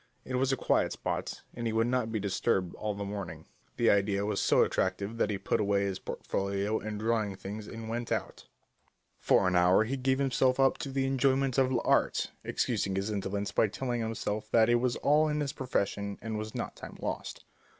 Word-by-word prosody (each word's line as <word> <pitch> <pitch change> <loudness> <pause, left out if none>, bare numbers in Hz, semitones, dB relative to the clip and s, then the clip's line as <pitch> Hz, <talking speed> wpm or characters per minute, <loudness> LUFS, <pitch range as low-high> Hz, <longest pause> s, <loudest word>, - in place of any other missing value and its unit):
It 130 - -6
was 130 +1 +2
a 135 - +1
quiet - - +1
spot, - - -4
and 120 -1 -3
he 110 - -1
would 115 +1 +3
not 120 -2 0
be 110 - -1
disturbed 95 -2 0
all 105 -1 -3
the 100 0 -4
morning. 90 -6 -6 0.3
The 120 - +4
idea 100 0 +2
was 105 -1 -1
so - - +5
attractive 100 +4 -1
that - - +1
he 105 - -1
put 95 - 0
away 100 -1 +2
his 95 -2 -2
portfolio 100 +2 -2
and 105 0 -5
drawing 110 -3 0
things 105 +3 -7
and 115 -1 -7
went 120 +1 -4
out. - - -3 0.7
For 95 - +3
an 90 - +1
hour 90 +4 +5
he 130 +5 -2
gave 130 0 +1
himself 130 -1 +2
up 135 0 +3
to 140 - -4
the 135 0 0
enjoyment 135 0 +2
of 130 -1 +3
l'Art, 120 -2 +2
excusing 100 -5 -1
his 100 +3 -1
indolence 100 0 -2
by 110 - +3
telling 120 +3 -3
himself 110 -1 -3
that 115 0 +4
it 120 0 +4
was 125 -1 +1
all 150 +2 +3
in 150 0 0
his 145 -2 -2
profession 100 -5 -2
and 110 0 -4
was 110 0 -5
not - - -4
time - - -10
lost. - - -4
110 Hz, 205 wpm, -30 LUFS, 100-125 Hz, 0.7 s, so